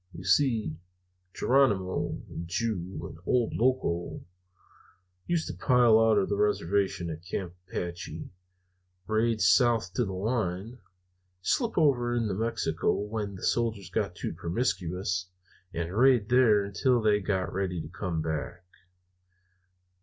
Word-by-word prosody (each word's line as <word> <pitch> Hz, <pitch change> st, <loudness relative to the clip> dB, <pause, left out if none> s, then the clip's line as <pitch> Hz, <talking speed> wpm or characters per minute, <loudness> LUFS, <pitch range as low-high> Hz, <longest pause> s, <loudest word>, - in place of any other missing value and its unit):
You 85 Hz, -, -9 dB
see, 110 Hz, -, +2 dB, 0.5 s
Geronimo, 105 Hz, -9 st, +1 dB
and 85 Hz, -, -7 dB
Ju, 95 Hz, -1 st, -3 dB
and 80 Hz, -, -11 dB
old 120 Hz, -3 st, +2 dB
Loco 115 Hz, -9 st, 0 dB, 1.0 s
used 170 Hz, -2 st, 0 dB
to -, -, -4 dB
pile 120 Hz, -4 st, +4 dB
out 110 Hz, -1 st, +4 dB
of 100 Hz, -, +2 dB
the 100 Hz, -, -1 dB
reservation 100 Hz, -3 st, 0 dB
at 80 Hz, +1 st, -8 dB
Camp 90 Hz, -1 st, -4 dB, 0.2 s
Apache, 85 Hz, -3 st, -5 dB, 0.7 s
raid 110 Hz, 0 st, +1 dB
south 115 Hz, -7 st, +3 dB
to 120 Hz, -, +1 dB
the 100 Hz, -, -3 dB
line, 105 Hz, +2 st, -2 dB, 0.6 s
slip 235 Hz, -, 0 dB
over 120 Hz, -7 st, +3 dB
into 110 Hz, -4 st, 0 dB
Mexico 115 Hz, +4 st, 0 dB
when 105 Hz, -1 st, -3 dB
the 90 Hz, -, -10 dB
soldiers 110 Hz, -6 st, -1 dB
got 100 Hz, -5 st, -1 dB
too -, -, -4 dB
promiscuous, 90 Hz, -2 st, -2 dB, 0.4 s
and 85 Hz, +2 st, -4 dB
raid 120 Hz, -3 st, +4 dB
there 120 Hz, -5 st, +5 dB
until 120 Hz, +5 st, +1 dB
they 105 Hz, -2 st, +3 dB
got 95 Hz, -3 st, -2 dB
ready 95 Hz, -2 st, -2 dB
to 80 Hz, -, -6 dB
come 85 Hz, -2 st, -3 dB
back. 80 Hz, +3 st, -4 dB
100 Hz, 130 wpm, -28 LUFS, 90-115 Hz, 1.0 s, there